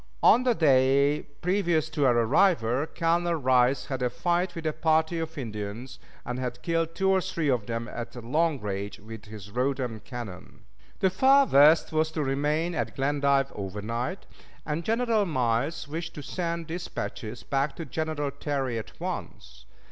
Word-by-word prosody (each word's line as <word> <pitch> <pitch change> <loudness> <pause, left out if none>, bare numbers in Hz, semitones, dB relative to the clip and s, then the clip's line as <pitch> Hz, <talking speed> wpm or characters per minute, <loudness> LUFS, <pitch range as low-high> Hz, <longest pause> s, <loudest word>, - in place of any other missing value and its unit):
On 235 - +7
the 250 -2 +2
day 140 -1 +4 0.2
previous 175 -4 +1
to 145 -2 +2
our 120 -1 +4
arrival 130 - +3
Colonel 170 +1 +1
Rice 130 -2 +3
had 130 -2 -4
a 125 - +1
fight 175 +5 0
with 165 -1 -6
a 155 - 0
party 160 +1 +1
of 160 0 -5
Indians, 110 0 -6 0.3
and 125 +1 -3
had 125 -1 -4
killed 165 -1 -1
two 190 +2 +2
or 190 -1 +3
three 170 -5 -2
of 120 -6 0
them 115 0 -3
at 120 0 -7
long 145 +6 0
range 100 0 -4
with 110 +1 -10
his 105 -2 -10
Rodman 125 -1 -1
cannon. 110 -2 -9 0.4
The 190 - +3
Far 270 +8 +5
West 150 - +5
was 155 0 +2
to 155 - -1
remain 150 +5 0
at 160 - -3
Glendive 140 -1 +1
overnight, 110 - -4 0.4
and 150 +2 -2
General 225 -2 +1
Miles 135 +2 0
wished 165 +3 -5
to 150 - -7
send 170 +1 -3
dispatches 155 -8 -5
back 140 +1 -1
to 165 - -6
General 150 0 -2
Terry 135 -6 -2
at 110 - -11
once. - - -6
145 Hz, 165 wpm, -27 LUFS, 120-165 Hz, 0.4 s, On